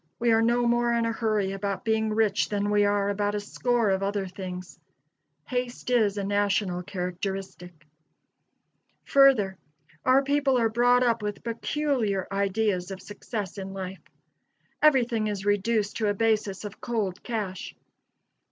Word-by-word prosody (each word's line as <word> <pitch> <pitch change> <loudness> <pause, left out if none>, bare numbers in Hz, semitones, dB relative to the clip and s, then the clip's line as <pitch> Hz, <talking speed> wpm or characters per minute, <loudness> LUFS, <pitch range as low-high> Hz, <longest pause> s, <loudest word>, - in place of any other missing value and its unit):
We 235 0 +2
are 225 0 +4
no 240 +1 +2
more 240 0 +2
in 230 0 +1
a 230 - 0
hurry 215 -4 0
about 200 +2 -3
being 220 -1 +1
rich 215 -2 +1
than 205 0 -1
we 205 0 +4
are 205 0 +1
about 205 0 -1
a - - 0
score 230 +1 0
of 190 0 0
other 200 0 -1
things. 185 -1 -8 0.7
Haste 250 -1 -3
is 215 -4 +3
a 200 - -1
national 200 -2 0
characteristic. 180 -2 -5 1.2
Further, 245 -9 +4 0.4
our 265 +2 +4
people 280 -1 +2
are 230 -2 +2
brought 245 +2 +4
up 230 -2 +1
with 210 -1 -4
peculiar 235 -4 -1
ideas 195 -2 0
of 190 -1 -6
success 205 0 -6
in 190 0 -6
life. 190 0 -6 0.8
Everything 245 -7 +3
is 205 -2 -4
reduced 205 +1 +1
to 220 - 0
a 205 - 0
basis 215 -2 0
of 205 0 -9
cold 205 -6 -2
cash. 210 -6 -4
210 Hz, 150 wpm, -26 LUFS, 195-235 Hz, 1.2 s, are